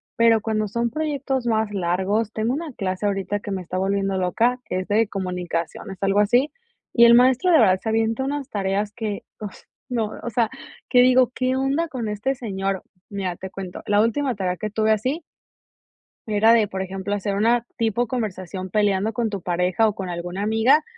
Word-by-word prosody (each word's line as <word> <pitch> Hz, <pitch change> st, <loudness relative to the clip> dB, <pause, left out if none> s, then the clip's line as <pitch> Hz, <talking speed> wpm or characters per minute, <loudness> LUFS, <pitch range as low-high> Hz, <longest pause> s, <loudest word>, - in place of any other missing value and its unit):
pero 230 Hz, -1 st, +4 dB
cuando 215 Hz, -1 st, -1 dB
son 235 Hz, +3 st, -1 dB
proyectos 275 Hz, -2 st, -2 dB
más 220 Hz, -2 st, +1 dB
largos 195 Hz, +4 st, 0 dB
tengo 225 Hz, +3 st, 0 dB
una 300 Hz, -1 st, -4 dB
clase 190 Hz, 0 st, -3 dB
ahorita 200 Hz, 0 st, -1 dB
que 205 Hz, -, -7 dB
me 190 Hz, -1 st, -2 dB
está 180 Hz, +1 st, -5 dB
volviendo 195 Hz, 0 st, 0 dB
loca, 230 Hz, +7 st, +1 dB
que 185 Hz, -, -2 dB
es 185 Hz, -, -5 dB
de 220 Hz, +2 st, +2 dB
comunicaciones, 180 Hz, -2 st, -4 dB
algo 195 Hz, +1 st, +3 dB
así, 245 Hz, +8 st, +3 dB, 0.4 s
y 235 Hz, 0 st, +6 dB
el 235 Hz, -, +8 dB
maestro 255 Hz, +8 st, +5 dB
de 325 Hz, -, +6 dB
verdad 190 Hz, -5 st, +4 dB
se 225 Hz, -, -4 dB
avienta 225 Hz, +3 st, +1 dB
unas 280 Hz, 0 st, -3 dB
tareas 200 Hz, +1 st, -1 dB
que 215 Hz, -3 st, -4 dB
uf, 210 Hz, -3 st, -7 dB, 0.3 s
no, 225 Hz, -4 st, -1 dB
o 240 Hz, -, -3 dB
sea, 230 Hz, -1 st, +1 dB, 0.4 s
que 250 Hz, -1 st, +6 dB
digo, 255 Hz, -1 st, +4 dB
¿qué 255 Hz, 0 st, 0 dB
onda 275 Hz, +5 st, 0 dB
con 250 Hz, -7 st, -4 dB
este 210 Hz, +6 st, -1 dB
señor? 195 Hz, -6 st, -3 dB, 0.3 s
Mira, 190 Hz, -3 st, -3 dB
te 190 Hz, -, -7 dB
cuento, 190 Hz, -2 st, -7 dB
la 205 Hz, 0 st, +4 dB
última 245 Hz, +3 st, 0 dB
tarea 185 Hz, -2 st, -1 dB
que 215 Hz, -, -4 dB
tuve 220 Hz, +1 st, +1 dB
así 255 Hz, +10 st, 0 dB, 1.1 s
era 215 Hz, +2 st, +4 dB
de, 220 Hz, -3 st, +4 dB
por 190 Hz, 0 st, -4 dB
ejemplo, 190 Hz, +1 st, -4 dB
hacer 200 Hz, 0 st, -1 dB
una 230 Hz, +3 st, +2 dB
tipo 230 Hz, +1 st, 0 dB
conversación 190 Hz, -6 st, -4 dB
peleando 205 Hz, +1 st, +1 dB
con 230 Hz, 0 st, -1 dB
tu 200 Hz, -3 st, -5 dB
pareja 180 Hz, +5 st, +1 dB
o 210 Hz, -, 0 dB
con 190 Hz, -2 st, -5 dB
alguna 175 Hz, +2 st, -4 dB
amiga. 225 Hz, +8 st, +3 dB
215 Hz, 190 wpm, -23 LUFS, 195-235 Hz, 1.1 s, el